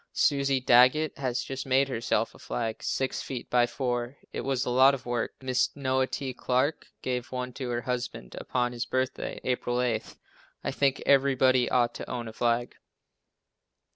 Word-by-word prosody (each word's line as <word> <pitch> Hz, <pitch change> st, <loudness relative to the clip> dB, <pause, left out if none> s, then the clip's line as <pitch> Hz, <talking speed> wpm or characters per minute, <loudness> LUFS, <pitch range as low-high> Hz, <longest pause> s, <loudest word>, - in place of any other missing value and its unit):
Susie 140 Hz, -2 st, +2 dB
Daggett 130 Hz, +5 st, +5 dB
has 130 Hz, -2 st, -1 dB
just 135 Hz, 0 st, -5 dB
made 135 Hz, +1 st, +3 dB
herself 115 Hz, -3 st, -1 dB
a -, -, -16 dB
flag, 115 Hz, -2 st, -3 dB
six 130 Hz, -1 st, -1 dB
feet 125 Hz, -3 st, -6 dB
by 120 Hz, -1 st, +4 dB
four. 125 Hz, 0 st, -2 dB, 0.2 s
It -, -, -3 dB
was 135 Hz, -2 st, -1 dB
a -, -, -1 dB
lot 130 Hz, +2 st, +6 dB
of 130 Hz, -, -11 dB
work. 120 Hz, -1 st, -2 dB
Mrs. 130 Hz, -1 st, 0 dB
Noah 130 Hz, -2 st, +1 dB
T. 135 Hz, -2 st, -4 dB
Clarke 130 Hz, +5 st, 0 dB, 0.2 s
gave 125 Hz, -1 st, -2 dB
one 125 Hz, -1 st, -4 dB
to 130 Hz, -1 st, -5 dB
her 120 Hz, 0 st, -1 dB
husband 125 Hz, 0 st, -4 dB
upon 125 Hz, -1 st, -1 dB
his 120 Hz, 0 st, -4 dB
birthday, 130 Hz, 0 st, -2 dB
April 125 Hz, -1 st, -1 dB
8. 120 Hz, -3 st, -1 dB, 0.5 s
I -, -, -1 dB
think 140 Hz, -1 st, +1 dB
everybody 130 Hz, -2 st, +4 dB
ought 120 Hz, -1 st, +2 dB
to -, -, -7 dB
own 120 Hz, -2 st, -4 dB
a 110 Hz, -, -8 dB
flag. 120 Hz, +1 st, 0 dB
125 Hz, 170 wpm, -28 LUFS, 120-135 Hz, 0.5 s, lot